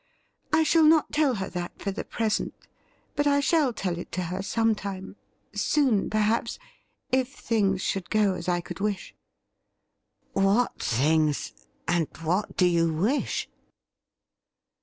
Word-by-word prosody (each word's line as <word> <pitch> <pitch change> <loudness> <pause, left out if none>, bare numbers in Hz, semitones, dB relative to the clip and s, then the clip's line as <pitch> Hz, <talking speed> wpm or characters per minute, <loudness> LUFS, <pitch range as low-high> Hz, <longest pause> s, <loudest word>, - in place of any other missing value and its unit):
I 320 +1 +4
shall 320 0 +4
not 315 0 +5
tell 295 -4 +2
her 190 -2 -3
that 175 0 -5
for 200 - -2
the 195 - -4
present, 220 -2 -1 0.6
but 290 0 +1
I 285 0 +4
shall 290 -2 +3
tell 180 -6 -3
it - - -8
to 185 - -1
her 190 - -2
some 225 +3 +1
time 195 -2 -6 0.2
— - - -43
soon, 265 -9 +2
perhaps, 215 +2 +1 0.5
if 260 +1 +1
things 195 -4 0
should 190 -2 -2
go 210 -3 +3
as 180 -1 -4
I 175 0 +1
could - - -8
wish.' 205 -1 -2 0.6
' - - -52 0.3
What 200 +5 +2
things, 150 +4 +1 0.3
and 165 -2 +1 0.2
what 180 +6 -1
do 180 - +5
you 170 -2 +3
wish 205 - 0
200 Hz, 150 wpm, -26 LUFS, 180-245 Hz, 0.6 s, not